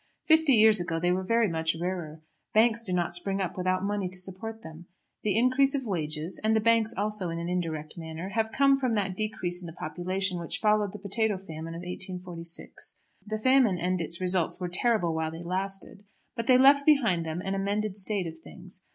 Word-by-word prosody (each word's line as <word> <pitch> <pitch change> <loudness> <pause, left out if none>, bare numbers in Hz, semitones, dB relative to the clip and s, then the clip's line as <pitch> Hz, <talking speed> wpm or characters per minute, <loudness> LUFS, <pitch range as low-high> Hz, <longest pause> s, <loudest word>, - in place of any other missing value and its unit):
Fifty 315 -3 +5
years 220 -2 +6
ago 170 -2 -2
they 175 +1 +1
were 185 +1 0
very 230 +4 +2
much 160 -2 -1
rarer. 170 -3 -4 0.3
Banks 230 +1 +4
do 195 - -4
not 175 -2 0
spring 195 +3 -1
up 190 -3 -2
without 185 0 0
money 200 -2 -1
to 185 - -2
support 195 +5 -5
them. 160 +2 -11 0.3
The 210 -1 0
increase 260 +4 +4
of 265 -2 -2
wages, 160 -3 -2
and 220 +1 +3
the - - +4
banks 225 0 +3
also 210 -3 -1
in 165 - -4
an 170 0 -4
indirect 165 -3 -3
manner, 165 +3 -6
have 220 +2 -1
come 275 +1 +4
from 255 -4 0
that 195 -3 -1
decrease 185 -4 -2
in 175 - -8
the 165 - -8
population 180 +3 -3
which 170 - -3
followed 210 -2 +1
the - - -6
potato 205 +1 -1
famine 165 -3 -8
of 170 - -7
1846. 180 -2 -5 0.3
The 215 +1 -2
famine 255 -4 +3
and 180 0 -1
its 165 +1 -3
results 180 -2 +1
were 180 -1 -3
terrible 180 -2 +2
while 160 0 -1
they 165 +2 -8
lasted; 195 +2 -3 0.3
but 230 -2 -4
they 255 - +7
left 280 +2 +6
behind 240 - +3
them 160 +1 -4
an 195 +1 -3
amended 200 +1 -1
state 200 -1 -1
of 160 0 -7
things. 185 +2 -13
190 Hz, 205 wpm, -28 LUFS, 175-220 Hz, 0.3 s, they